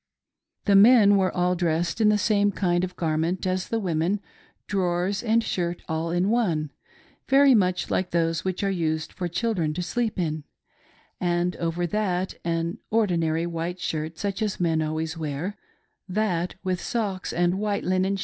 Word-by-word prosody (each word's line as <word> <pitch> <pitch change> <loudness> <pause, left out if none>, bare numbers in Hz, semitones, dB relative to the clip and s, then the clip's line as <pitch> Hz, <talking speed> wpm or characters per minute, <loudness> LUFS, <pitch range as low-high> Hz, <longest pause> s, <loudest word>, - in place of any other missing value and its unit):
The 200 - +4
men 205 0 +7
were 190 -2 +2
all 180 0 +1
dtessed 170 +3 0
in 215 - +5
the 210 - +4
same 205 0 +2
kind 175 -2 0
of 185 0 -4
gar 155 -2 -1
ment 175 +4 -1
as 185 0 -1
the 230 - -1
women:' 180 +1 0 0.3
— - - -36
drawers 185 0 0
and 230 0 +2
shirt 175 -3 -2
all 160 +1 -2
in 175 +4 +1
one 165 -11 0 0.6
^ - - -27
very 275 0 +6
much 185 -5 +1
like 185 -1 0
those 165 0 0
which 185 +1 -2
are 195 - +1
iised 160 -3 -2
fof 175 -2 -3
children 175 -6 -1
to 180 - -2
sleep 230 +3 -2
in—' 155 -4 -2 0.8
and 175 0 0
over 170 +1 -1
that 185 -1 -1
an 165 0 -2
ordinary 170 -7 +1
white 170 +1 -4
shirt, 160 -1 -3
such 200 +3 -3
as 210 -2 -1
men 165 -3 +1
always 160 +1 -3
wear; 155 +6 -3 0.3
— - - -41
that, 180 -5 0
with 185 -2 -1
socks 205 -5 -2
and 175 +2 +1
white 205 -1 -1
linen. 185 +2 +1
180 Hz, 180 wpm, -25 LUFS, 165-200 Hz, 0.8 s, men